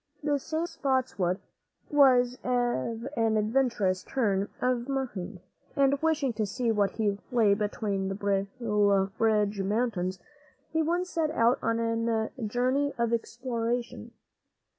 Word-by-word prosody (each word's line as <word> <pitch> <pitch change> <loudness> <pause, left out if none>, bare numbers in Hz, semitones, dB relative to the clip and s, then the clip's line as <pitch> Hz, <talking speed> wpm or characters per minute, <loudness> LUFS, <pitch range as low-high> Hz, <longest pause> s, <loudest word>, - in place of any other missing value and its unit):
This 290 -2 +1
same 320 +1 -1
Spotswood 255 - -1 0.5
was 255 -4 +4
of 240 - -1
an 225 -1 +2
adventurous 215 -4 +1
turn 205 -6 0
of 250 0 0
mind, 210 -9 -4 0.3
and 275 0 +3
wishing 310 -5 +1
to 215 -1 -1
see 235 +3 -1
what 205 -2 0
lay 210 +1 +2
beyond 205 -2 -2
the 195 - -3
Blue 200 0 +1
Ridge 210 -2 +2
Mountains, 195 -3 -1 0.6
he 320 - +2
once 350 +3 -1
set 320 -2 0
out 240 -5 +2
on 230 - 0
a 230 -1 0 0.2
journey 255 +5 +1
of 235 -1 0
exploration. 235 0 -3
230 Hz, 120 wpm, -28 LUFS, 205-260 Hz, 0.6 s, was